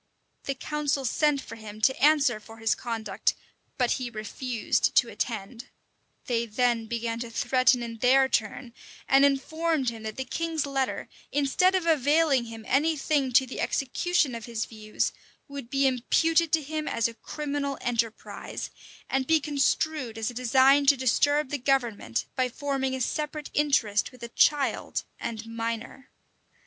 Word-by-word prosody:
[] - - -47
The 275 - -2
council 290 -1 -2
sent 290 +3 +2
for 230 - -10
him 215 -1 -10
to 265 +4 +4
answer 285 -7 +4
for 225 +1 -14
his 225 0 +1
conduct; 225 -5 -2 0.4
but 250 -2 +1
he 255 -2 -1
refused 230 +1 -1
to - - +4
attend: 230 +2 -4 0.6
they 235 -1 -1
then 230 0 0
began 230 0 -3
to 235 0 -5
threaten 250 +1 +2
in 230 -1 -6
their 265 +3 +5
turn, 235 0 -2 0.3
and 270 +1 +5
informed 280 0 +1
him 225 -1 -9
that 220 0 -5
the 265 - -3
king's 325 +2 -2
letter, 270 -2 -2 0.2
instead 290 +7 +2
of 370 -3 0
availing 295 -3 +3
him 225 -1 -9
any 305 +5 +2
thing 275 -2 0
to 265 - +6
the 260 - -7
execution 285 +1 0
of 230 -1 -6
his 230 -2 -3
views, 215 -1 -3 0.3
would 280 -4 -8
be 275 +1 +1
imputed 320 +6 +2
to 320 -2 +3
him 310 +2 -4
as 230 -1 +1
a 230 - -8
criminal 280 +2 -4
enterprise, 230 -2 -3 0.4
and 265 0 -1
be 320 0 +4
construed 290 -3 0
as 225 +2 -2
a - - -12
design 265 +3 +4
to 280 0 +6
disturb 290 +3 +2
the 290 - -2
government, 240 - 0
by 255 -1 +1
forming 265 0 -2
a 260 - -4
separate 300 +3 -3
interest 250 -9 +1
with 250 -2 -14
a 235 - -5
child 285 +3 +1 0.2
and 225 -1 -5
minor. 230 +3 -5
260 Hz, 160 wpm, -27 LUFS, 230-285 Hz, 0.6 s, to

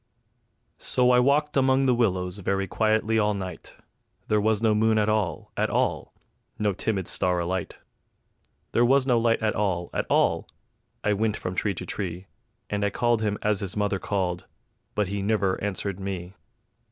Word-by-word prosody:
So 125 0 +3
I 125 - +5
walked 150 +4 +2
among 135 0 +3
the 130 - +4
willows 95 -5 0
very 95 0 0
quietly 110 +2 +1
all 105 -1 +2
night; 95 -2 -7 0.5
There 105 -1 +3
was 110 0 +2
no 110 -1 +3
moon 110 +1 +3
at 105 0 +2
all, 105 -8 -1
at - - 0
all; - - 0 0.5
no 105 -2 +1
timid 95 -1 -2
star 90 -1 0
alight; 90 +2 -2 1.0
There 120 - +3
was 130 +2 +4
no 125 -3 +3
light 115 -1 +1
at 110 - +2
all, 90 -4 -1
at - - -2
all; - - +2 0.6
I 105 - +2
wint 110 +1 0
from 90 - -4
tree 100 +1 0
to - - -6
tree, 90 -2 -4 0.4
And 105 0 -2
I 100 - +2
called 120 +1 +1
him 105 -1 0
as 105 -2 +2
his 100 0 -4
mother 105 -2 0
called, 95 -3 -2 0.5
but 105 -2 +1
he 100 0 -2
nivver 100 -2 0
answered 100 -1 -3
me. 95 -2 -5
105 Hz, 175 wpm, -26 LUFS, 95-110 Hz, 1.0 s, I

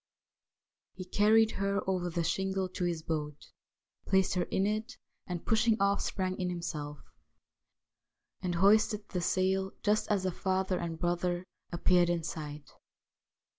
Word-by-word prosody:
He 185 - -7
carried 220 +4 +4
her 200 0 -1
over 180 -2 0
the 170 0 -1
shingle 190 +2 0
to 180 0 -3
his 170 -2 -2
boat, 150 -2 -4 0.6
placed 190 -1 +3
her 180 -1 0
in 190 - 0
it, 215 +5 -2 0.3
and 175 -3 -5
pushing 225 0 +3
off 200 0 +2
sprang 185 -2 -2
in 180 -1 -1
himself, 155 -4 -4 1.4
and 175 -1 -1
hoisted 210 +3 +3
the 180 - -2
sail 190 +2 +1
just 210 +1 +1
as 200 -3 +1
the 185 - 0
father 190 0 -1
and 170 -1 -4
brother 175 +1 -1 0.3
appeared 175 0 +3
in 170 -1 0
sight. 150 -2 -6
185 Hz, 140 wpm, -31 LUFS, 175-200 Hz, 1.4 s, carried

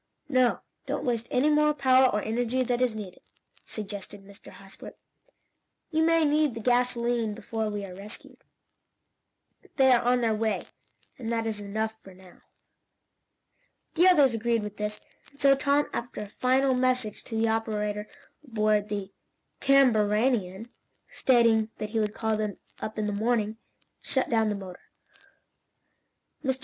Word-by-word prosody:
"No, 255 -3 +2 0.3
don't - - -3
waste 235 -2 -1
any 275 +5 +2
more 300 0 +3
power 260 -2 +5
or 210 -2 -1
energy 245 +3 0
than 245 0 -1
is 245 -3 +1
needed," 200 -4 -8 0.4
suggested 205 -1 -7
Mr. 200 +1 -14
Hosbrook. 195 0 -12 0.9
"You 315 0 +1
may 330 0 +4
need 295 -3 +2
the - - -5
gasolene 240 -2 +1
before 220 0 -3
we 205 -1 -4
are 185 - -9
rescued. 200 +4 -9 1.3
They 265 -1 +5
are 245 -1 +5
on 245 +1 +2
their 225 -2 +2
way, 220 0 -1 0.6
and 235 -2 -4
that 230 -1 -1
is 220 -2 -3
enough 220 +2 -3
for 190 -1 -14
now." 185 -1 -18 1.5
The 350 +3 +4
others 290 -9 +5
agreed 230 0 0
with 210 0 -7
this, 210 0 -3 0.3
and 280 - -25
so 275 -1 +6
Tom, 285 +1 +1
after 240 -2 -5
a - - -5
final 260 +5 +1
message 250 -4 0
to 225 - -5
the 225 0 +2
operator 210 -2 -2 0.4
aboard 215 -5 0
the 200 -2 -4 0.5
CAMBARANIAN 225 -5 +2 0.4
stating 230 -3 +3
that 210 0 -5
he 225 - 0
would 210 0 -1
call 220 -1 -1
him 215 -2 -3 0.2
up 215 - -6
in 215 - -1
the 205 - -2
morning, 220 0 0 0.4
shut 265 -1 -1
down 225 -2 +2
the 210 - -1
motor. 190 -2 -9 1.6
Mr. 265 -2 -1
225 Hz, 150 wpm, -27 LUFS, 210-255 Hz, 1.6 s, so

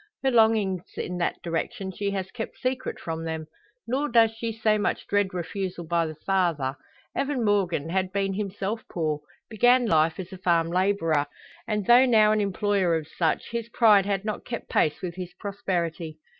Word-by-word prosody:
Her 265 - +3
longings 220 -6 +3 0.2
in 180 0 -3
that 170 - -2
direction 175 +3 -3
she 200 +2 -2
has 190 -2 -3
kept 225 -2 -6
secret 255 0 -3
from 165 0 -4
them. 160 -1 -4 0.4
Nor 275 +5 -1
does 230 -2 +5
she 225 0 -4
so 215 -1 +1
much 205 - -1
dread 205 -1 +1
refusal 180 0 -4
by 170 0 +1
the 155 - -7
father. 170 -9 +1 0.4
Evan 275 -4 0
Morgan 195 -7 +1
had 185 +1 0
been 195 0 0
himself 205 +2 -3
poor 155 -3 -1 0.3
began 245 +3 +4
life 160 -4 +2
as 190 +1 -7
a 185 - -9
farm 170 -2 +2
labourer 170 -5 +1 0.4
and, 210 -2 -1
though 245 +4 +7
now 215 -3 +5
an 215 0 +2
employer 200 -3 +1
of 155 -2 -3
such, 165 +5 -1
his 235 -1 -3
pride 210 -4 +5
had 200 0 -1
not 215 -1 -3
kept 235 -2 -6
pace 150 +3 +1
with 175 -1 -4
his 180 -1 -7
prosperity. 170 -5 -3
195 Hz, 180 wpm, -26 LUFS, 170-215 Hz, 0.4 s, though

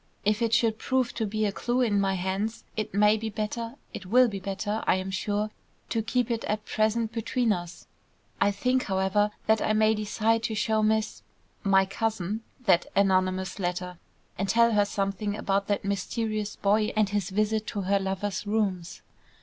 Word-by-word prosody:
If 210 +2 +2
it 230 -1 +1
should 230 -1 +2
prove 260 -2 0
to 225 -2 -2
be 215 +1 -1
a 205 - +1
clue 240 +5 -1
in 210 -5 +2
my 195 -1 +1
hands, 190 +5 -2
it 215 - -3
may 210 +2 +4
be 220 +1 -3
better, 225 +3 -4 0.2
it 185 - -7
will 250 +5 +5
be 200 -4 -4
better, 205 +3 -3
I - - +5
am 190 +1 -3
sure, 210 +2 -1 0.4
to 225 - 0
keep 240 +2 0
it 230 -1 -1
at 210 0 -2
present 220 +1 0
between 230 0 0
us 175 -1 -6
two. - - -5
I - - +4
think, 250 +6 0
however, 190 +2 +1 0.2
that 220 0 +3
I 215 - +1
may 215 0 +4
decide 220 +1 0
to 220 - -2
show 220 0 +1
Miss 220 0 0 0.4
my 195 -1 +4
cousin 215 0 -2 0.2
that 175 -4 +4
anonymous 185 -1 +1
letter, 180 -1 -3 0.4
and 195 0 -1
tell 235 +3 +4
her 205 -2 +3
something 200 +1 -2
about 195 -1 0
that 205 -1 -1
mysterious 215 +2 -2
boy 210 +2 +2
and 215 -2 +3
his 205 -2 -1
visit 215 +2 0
to 205 - -3
her 200 +1 +2
lover's 195 +1 -3
rooms." 195 -5 -1
210 Hz, 185 wpm, -27 LUFS, 195-220 Hz, 0.4 s, will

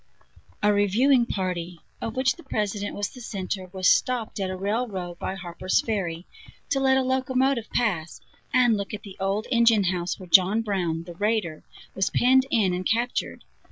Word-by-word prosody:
A 210 0 +4
reviewing 235 +6 +3
party, 180 -4 -3 0.2
of 225 - -4
which 260 0 +2
the 345 - -14
President 205 -5 -2
was 205 0 -2
the 250 - -12
center, 190 -4 -4
was 185 -1 0
stopped 245 -5 +1
at 190 -1 -1
a 185 - -3
railroad 195 -3 -3
by 190 - -3
Harper's 185 0 -1
Ferry, 180 -6 -2 0.5
to 270 - +2
let 265 0 +3
a 265 - +2
locomotive 260 -1 0
pass, 175 -9 -1 0.3
and 245 -3 +4
look 200 +1 -4
at 210 - -11
the 195 -3 -10
old 195 +3 -1
engine 230 -4 +4
house 175 -1 -1
where 185 - -9
John 190 +5 +5
Brown, 175 -6 -1
the 175 0 -9
raider, 205 -4 -1 0.3
was 190 - 0
penned 260 +2 +4
in 210 -8 +2
and 180 +1 -2
captured. 235 +5 -1
205 Hz, 175 wpm, -25 LUFS, 185-240 Hz, 0.5 s, John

